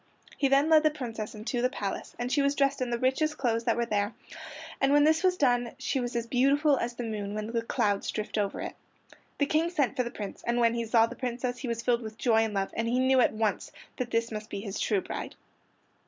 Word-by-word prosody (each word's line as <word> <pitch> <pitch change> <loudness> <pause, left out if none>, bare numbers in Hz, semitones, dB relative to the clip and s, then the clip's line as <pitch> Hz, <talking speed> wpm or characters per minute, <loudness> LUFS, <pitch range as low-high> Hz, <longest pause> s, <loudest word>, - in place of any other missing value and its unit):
He 280 - +2
then 275 +2 +4
led 315 -1 +6
the 310 - +4
Princess 230 -8 -6
into 235 +3 -3
the 250 - +2
palace, 205 -7 -5
and 245 +1 -3
she 285 - +3
was 280 +1 +2
dressed 275 -2 +1
in 250 - -1
the 235 - 0
richest 300 +5 +1
clothes 230 -3 0
that - - +2
were 235 - +1
there, 205 -1 -1 0.7
and 270 - +3
when 290 0 +5
this 315 +2 +4
was 365 -1 +3
done 245 -5 +2
she 270 - -1
was 245 -1 -3
as 235 -1 -1
beautiful 275 +5 +3
as 240 0 -3
the 245 - -4
moon 210 -2 -4
when 215 0 -3
the 230 -1 0
clouds 205 -3 0
drift 215 -1 -4
over 200 -1 -2
it. - - -5 0.6
The 285 - +2
King 315 +4 +1
sent 285 -10 0
for - - +1
the 240 - -3
Prince, 205 -4 -7
and 235 0 +1
when 230 -1 +4
he 235 -1 -2
saw 225 0 +4
the - - -8
Princess 245 0 -3
he 265 - -5
was 230 0 -3
filled 240 0 +2
with 220 -1 -8
joy 235 -2 +2
and 225 -2 +1
love, 195 0 -1
and 230 +1 -1
he 240 +2 +1
knew 260 0 +4
at 245 - +4
once 215 -3 -1 0.3
that 250 -1 -3
this 230 0 0
must 215 0 -6
be 200 - -5
his 200 -1 -5
true 205 -4 +1
bride. - - -6
240 Hz, 255 wpm, -28 LUFS, 225-270 Hz, 0.7 s, led